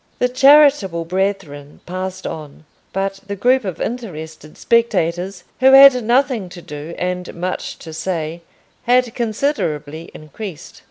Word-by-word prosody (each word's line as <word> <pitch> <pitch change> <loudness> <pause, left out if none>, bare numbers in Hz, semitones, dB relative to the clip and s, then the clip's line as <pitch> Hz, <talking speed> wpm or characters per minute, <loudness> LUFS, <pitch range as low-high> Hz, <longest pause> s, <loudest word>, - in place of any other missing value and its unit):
The 250 - +1
charitable 270 - +4
brethren 180 -6 -3
passed 185 +1 -5
on, 155 0 -8 0.3
but 195 0 -3
the 200 - -4
group 250 +6 +2
of 185 -5 -5
interested 160 -10 -6
spectators, 185 -5 0 0.2
who 265 +1 +5
had 270 -2 +8
nothing 240 -4 +1
to 175 0 -11
do 150 +3 -8
and 180 0 -3
much 180 +2 -4
to 160 - -10
say, 165 0 -4 0.4
had 250 -1 +2
considerably 170 - -2
increased. 155 +3 -9
190 Hz, 125 wpm, -19 LUFS, 165-240 Hz, 0.4 s, had